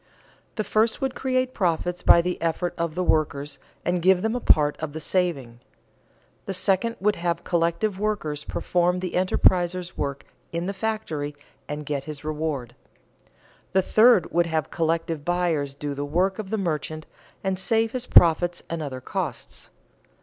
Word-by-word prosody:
The 215 - -1
first 220 +2 +1
would 265 -2 -1
create 255 -1 -1
profits 175 -1 -1
by 170 - +6
the 180 0 -3
effort 170 +2 -1
of 170 -2 -2
the 185 - 0
workers, 145 -3 0 0.3
and 175 0 +1
give 185 +1 +4
them 220 +2 0
a - - 0
part 150 -9 +4
of 155 -2 -5
the 160 - -5
saving. 150 -9 -1 0.9
The 195 - -3
second 195 +5 +1
would 210 +2 +1
have 170 0 -1
collective 175 +4 0
workers 200 -9 -2
perform 180 0 0
the 180 0 -3
enterpriser's 180 -1 +1
work 140 -1 -3 0.3
in 170 +1 -2
the 200 - -2
factory 190 -9 -3 0.3
and 150 0 -4
get 140 -2 -3
his 150 -1 -7
reward. 150 -5 -3 1.0
The 190 0 +3
third 215 -3 +5
would 175 0 +2
have 160 -3 -2
collective 165 -2 -1
buyers 165 -5 0
do 145 0 -4
the 140 +1 -4
work 180 +7 0
of 205 -3 -5
the 220 - -1
merchant 155 -4 -3 0.4
and 190 -1 -1
save 225 +2 +1
his 250 0 -3
profits 175 +1 +5
and 165 -1 -2
other 135 -4 -5
costs. - - -5
175 Hz, 165 wpm, -25 LUFS, 155-190 Hz, 1.0 s, by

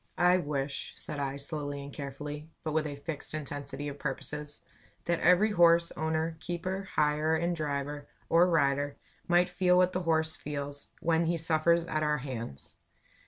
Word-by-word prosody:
"I 180 +1 +5
wish," 145 -3 -3
said 150 - -5
I, 140 0 -2
slowly 145 -1 -3
and 140 0 -9
carefully, 145 +2 -6
but 155 - -2
with 155 -1 +1
a 145 - -5
fixed 150 +1 -5
intensity 145 -1 -5
of 145 0 -6
purposes, 150 +1 -5 0.4
"that 170 -1 +1
every 180 +5 +5
horse 170 -2 +5
owner, 160 +1 -1
keeper, 185 +3 -4
hirer 150 +1 +2
and 170 +2 0
driver 145 -1 -3 0.2
or 175 +2 +5
rider, 145 -3 +2 0.3
might 175 0 +4
feel 180 0 +3
what 180 0 +4
the 185 - 0
horse 160 -2 +2
feels, 145 -1 -5
when 165 0 +2
he 170 +1 +1
suffers 165 +1 +3
at 155 -3 -1
our 150 -1 +2
hands. 120 - -6
155 Hz, 165 wpm, -30 LUFS, 145-170 Hz, 0.4 s, I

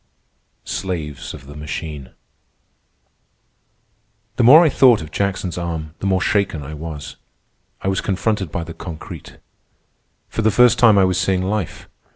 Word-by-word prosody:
SLAVES 85 -7 -4
OF - - -13
THE 70 +1 -11
MACHINE 75 -2 -6 2.3
The 125 - +3
more 150 +8 +9
I - - +4
thought 130 -4 +5
of 75 - -11
Jackson's 95 -2 -2
arm, 80 -3 -4
the 100 - -2
more 95 -1 +1
shaken 100 -7 0
I 75 +3 -8
was. 75 -1 -7 0.7
I - - -2
was 95 -1 0
confronted 100 -2 -1
by 85 - -3
the 85 0 -8
concrete. 80 -3 -9 0.9
For - - -3
the 110 - +3
first 125 +3 +4
time 110 -4 +6
I 95 - +5
was 90 -1 +1
seeing 95 0 +1
life. 100 -2 -3
95 Hz, 150 wpm, -20 LUFS, 80-100 Hz, 2.3 s, more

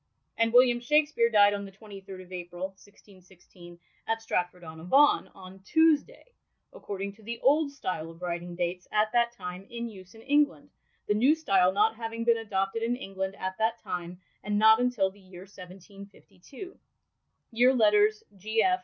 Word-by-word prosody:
And 230 0 +1
William 245 0 +5
Shakspeare 290 -2 +2
died 205 -2 +5
on 200 0 -4
the 195 - -10
23rd 195 -2 -11
of 180 - -19
April, 175 +1 -6
1616, 185 -3 -18 0.3
at 225 0 0
Stratford 180 -5 -3
on 160 0 -10
Avon, 275 - +4
on 190 0 -13
Tuesday, 310 +9 +1 0.5
according 200 - -6
to 220 - -21
the 230 +2 -6
Old 290 +2 +3
Style 185 - -5
of 165 0 -13
writing 175 0 -4
dates 180 +1 -3
at 215 0 +1
that 235 -1 +2
time 185 -3 -8
in 235 0 -5
use 190 -3 -13
in 225 - -15
England, 285 0 +1 0.4
the - - +2
New 255 +9 +4
Style 195 - +2
not 215 +3 +2
having 230 0 -5
been 235 0 +3
adopted 195 0 -2
in 235 +2 0
England 195 -4 -5
at 185 0 -4
that 225 +1 +1
time, 175 0 -6 0.2
and 210 0 -1
not 220 +1 +6
until 245 -6 +1
the 200 - -20
year 185 -2 -13
1752. 195 - -13 0.8
(Year 245 +3 +4
Letters 210 -2 +3
G. 215 +4 0
205 Hz, 165 wpm, -28 LUFS, 185-235 Hz, 0.8 s, not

